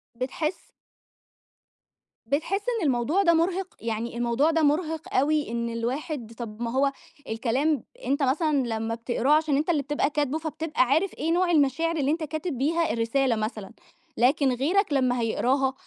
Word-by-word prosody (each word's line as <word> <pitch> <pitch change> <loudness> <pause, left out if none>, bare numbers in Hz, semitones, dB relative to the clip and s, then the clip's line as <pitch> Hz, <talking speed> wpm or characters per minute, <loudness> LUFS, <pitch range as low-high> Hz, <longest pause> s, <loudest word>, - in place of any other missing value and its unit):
بتحس 275 +7 -4 1.6
بتحس 320 - 0 0.2
إن - - 0
الموضوع 270 +10 +1
ده 340 -2 +5
مُرهِق؟ 360 +3 0
يعني، 230 +1 -3
الموضوع 240 +6 +2
ده 325 0 +1
مُرهِق 320 +4 0
أوي، 300 -3 +2
إن 235 0 -2
الواحد 235 +1 -4
طب 230 -1 -7
ما 230 -1 -2
هو 275 +2 +2 0.4
الكلام، 260 +7 0 0.2
أنتَ 280 +1 +1
مثلًا 300 +3 +2
لما 225 0 -2
بتقراه 240 +4 -1
عشان 305 -2 +3
أنتَ 305 +4 -1
اللي 310 -5 +2
بتبقى 290 +1 0
كاتبه، 295 0 -1
فبتبقى 320 -1 -2
عارف 315 +9 +1
إيه 320 +3 -2
نوع 355 0 +2
المشاعر 325 +2 +2
اللي 285 -1 +1
أنتَ 320 0 -1
كاتب 310 -1 -4
بيها 320 0 +1
الرسالة 235 +2 +1
مثلًا، 215 -2 -4 0.5
لكن 265 +2 +3
غيرك 310 - +1
لمّا 250 -3 +2
هيقراها 265 +4 +1
280 Hz, 155 wpm, -26 LUFS, 240-315 Hz, 1.6 s, ده